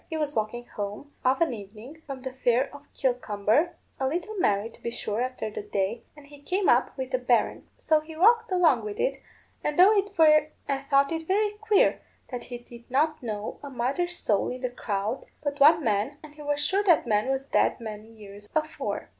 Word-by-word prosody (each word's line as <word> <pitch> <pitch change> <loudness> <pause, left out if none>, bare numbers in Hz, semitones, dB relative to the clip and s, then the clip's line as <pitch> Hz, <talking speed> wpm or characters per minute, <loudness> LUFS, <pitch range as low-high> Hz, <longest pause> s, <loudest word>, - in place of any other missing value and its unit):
He 320 - -3
was 300 -1 -2
walking 220 +3 -2
home, 210 +8 -6
of 260 +5 +2
an 325 -6 +2
evening, 220 +8 -10
from 270 -2 -7
the 260 -1 -5
fair 255 +1 +1
of 285 0 -14
Kilcumber, 250 - +1 0.2
a 265 - +1
little 345 +9 -3
merry, 205 - +2
to - - -20
be - - -3
sure, 220 -1 -3
after 255 -4 -3
the - - -5
day, 205 +2 -2 0.2
and 295 - -13
he 285 0 -15
came 370 +6 0
up 245 +2 +3
with 260 0 -5
a 255 - +2
berrin. 245 -1 +1
So 315 -2 +3
he 315 +1 -11
walked 455 +4 +4
along 330 -11 +4
with 210 -1 -6
it, - - 0 0.4
and 295 - -1
thought 305 -8 +3
it 325 -1 -3
very 415 +2 +2
queer 420 -1 +2 0.3
that 245 -2 -5
he 245 - -6
did 240 0 -15
not 305 +4 +1
know 215 -3 -5
a 285 - -7
mother's 275 +8 -1
soul 210 - 0
in 250 0 -6
the 250 -1 -2
crowd 215 +1 -3 0.2
but 285 -1 -2
one 310 +3 +7
man, 220 +5 0
and 305 -1 -12
he 300 - -12
was 290 0 -1
sure 395 +2 +2
that 350 -5 +4
man 215 0 +1
was 270 0 -1
dead - - +2
many 215 -2 -7
years 205 -2 -13
afore. 310 0 -2
270 Hz, 200 wpm, -27 LUFS, 230-315 Hz, 0.4 s, one